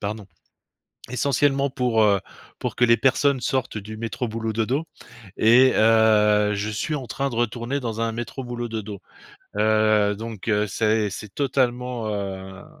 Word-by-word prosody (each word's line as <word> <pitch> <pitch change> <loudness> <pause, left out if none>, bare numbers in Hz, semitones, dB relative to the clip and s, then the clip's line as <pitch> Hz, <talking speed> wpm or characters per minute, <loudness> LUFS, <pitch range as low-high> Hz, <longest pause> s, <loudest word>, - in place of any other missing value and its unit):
pardon, 105 0 -5 0.8
essentiellement 140 +1 +1
pour, 125 -4 +1
heu, 100 -2 +3 0.4
pour - - -3
que 120 - +4
les 115 0 +4
personnes 135 +2 +2
sortent 130 -3 -1
du 105 +1 -8
métro-boulot-dodo, 115 +4 -2 0.5
et 125 +4 +6
heu, 105 -2 +4
je 105 +1 -2
suis 110 +8 -2
en 130 -4 -6
train 140 0 -2
de 120 - -6
retourner 120 +3 -1
dans 115 -3 -4
un 115 - 0
métro-boulot-dodo, 120 -3 -5 0.6
heu. 110 -1 +3
Donc, 115 -1 -7
heu, 105 0 +2
c'est 110 +1 0
c'est 100 +1 -8
totalement, 125 -4 -1
heu, 95 -2 -5
ze - - -16
115 Hz, 140 wpm, -23 LUFS, 105-125 Hz, 0.8 s, et